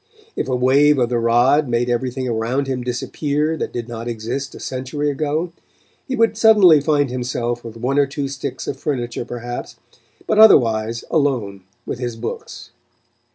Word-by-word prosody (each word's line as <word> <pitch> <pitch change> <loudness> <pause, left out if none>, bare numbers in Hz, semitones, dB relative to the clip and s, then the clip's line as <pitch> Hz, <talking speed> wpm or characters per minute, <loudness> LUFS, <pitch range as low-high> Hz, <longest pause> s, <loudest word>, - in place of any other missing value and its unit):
If - - -2
a 130 - 0
wave 140 +4 +4
of 120 -2 +1
the 120 -1 0
rod 120 +6 +3
made 120 +1 0
everything 125 +1 -2
around 120 +4 -1
him 130 -2 -3
disappear 145 +5 -2
that - - -4
did 120 -1 -5
not 115 -1 -6
exist 120 +4 -4
a - - -10
century 135 +3 -3
ago, 155 +4 -2 0.6
he 260 - -2
would 225 -2 +2
suddenly 210 -9 +6
find 145 -3 +1
himself 120 -1 -3
with 115 -1 -9
one 130 +5 0
or 140 - +3
two 140 0 -4
sticks 135 0 -5
of 135 - -4
furniture, 120 -5 -3
perhaps, 120 0 -6 0.5
but 215 - +1
otherwise 115 - +5
alone 120 -10 0 0.2
with - - -5
his 120 -2 -3
books. 115 0 -7
130 Hz, 165 wpm, -20 LUFS, 120-145 Hz, 0.6 s, suddenly